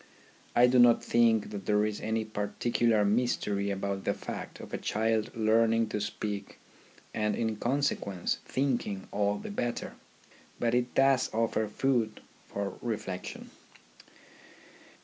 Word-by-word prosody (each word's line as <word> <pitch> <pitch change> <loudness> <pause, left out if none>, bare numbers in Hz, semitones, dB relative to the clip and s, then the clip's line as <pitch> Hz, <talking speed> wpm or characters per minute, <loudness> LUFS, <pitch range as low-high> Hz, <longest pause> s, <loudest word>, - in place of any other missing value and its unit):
I 120 - +7
do 125 0 +4
not 120 -1 +6
think 115 -2 +3
that 100 -3 -7
there 105 0 +3
is 105 -1 -3
any 110 0 -1
particular 110 +1 +1
mystery 105 -2 +1
about 100 0 -2
the - - 0
fact - - -7
of - - -10
a - - -2
child 110 +1 0
learning 115 0 +3
to 105 - -2
speak 105 -1 -4 0.6
and 105 -1 0
in 110 -1 -1
consequence 120 -8 -1
thinking 120 -8 -1
all 100 0 +1
the 205 - -7
better; 120 -12 -3 0.7
but 115 -1 +1
it 125 0 0
does 135 -1 +4
offer 110 -1 +1
food 115 0 0 0.3
for 100 -1 -4
reflection. 100 -5 -5
110 Hz, 130 wpm, -30 LUFS, 105-120 Hz, 0.7 s, I